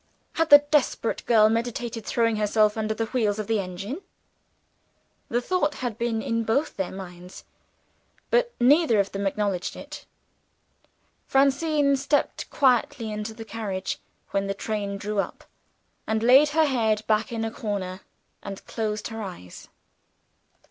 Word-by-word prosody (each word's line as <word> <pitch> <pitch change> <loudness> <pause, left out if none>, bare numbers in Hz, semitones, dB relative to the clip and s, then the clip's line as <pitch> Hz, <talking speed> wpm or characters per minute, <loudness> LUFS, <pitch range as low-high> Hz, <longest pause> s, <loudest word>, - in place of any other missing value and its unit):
Had 325 0 +1
the 290 - +12
desperate 275 -6 +1
girl 220 -2 +6
meditated 230 0 -2
throwing 230 -2 +1
herself 210 0 +2
under 220 0 -1
the 225 - -1
wheels 220 -4 0
of 215 - -3
the 220 0 0
engine? 195 - -5 1.3
The 240 +1 0
thought 320 -2 0
had 245 -3 -4
been 230 -2 -1
in 230 0 -1
both 270 +8 0
their 190 -2 -3
minds; 180 -1 -10 0.9
but 485 0 +3
neither 260 -2 +5
of 195 - +1
them 200 0 -2
acknowledged 195 -2 -2
it. - - -10 1.2
Francine 280 +1 +3
stepped 280 +2 -1
quietly 245 -4 +2
into 210 +1 -5
the 225 -1 -8
carriage, 200 -4 -4 0.3
when 195 0 0
the 195 - -2
train 200 -1 -3
drew 205 +1 -3
up, - - -3 0.6
and 220 0 0
laid 265 +5 +7
her 315 +1 +3
head 220 -6 +1
back 215 +1 +1
in 225 -1 -2
a 225 - -3
corner, 195 -4 -4 0.4
and 195 -1 -8
closed 215 -1 -3
her 225 0 -6
eyes. 175 - -9
220 Hz, 145 wpm, -25 LUFS, 205-250 Hz, 1.3 s, the